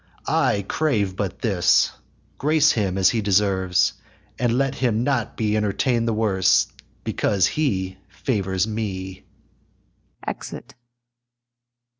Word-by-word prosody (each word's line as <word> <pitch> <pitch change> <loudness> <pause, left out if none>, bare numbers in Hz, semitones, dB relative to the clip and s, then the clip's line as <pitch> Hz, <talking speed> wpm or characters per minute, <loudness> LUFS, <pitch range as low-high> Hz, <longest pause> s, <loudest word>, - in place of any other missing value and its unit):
I 100 -1 +1
crave 105 -12 0
but 100 -2 -4
this, 100 -7 +3 0.5
grace 150 +1 +4
him 100 -4 -1
as 95 -1 +4
he 115 - 0
deserves, 95 -3 +2 0.5
And 120 0 +1
let 135 0 +1
him 120 -4 0
not 125 -5 -1
be 105 -1 0
entertain'd 115 +3 0
the 115 - +1
worse 100 -4 +3 0.4
Because 100 -3 +1
he 95 -11 -1
favours 95 -2 -1
me. 95 -4 -5 1.0
[Exit. - - -7
105 Hz, 110 wpm, -23 LUFS, 95-120 Hz, 1.0 s, grace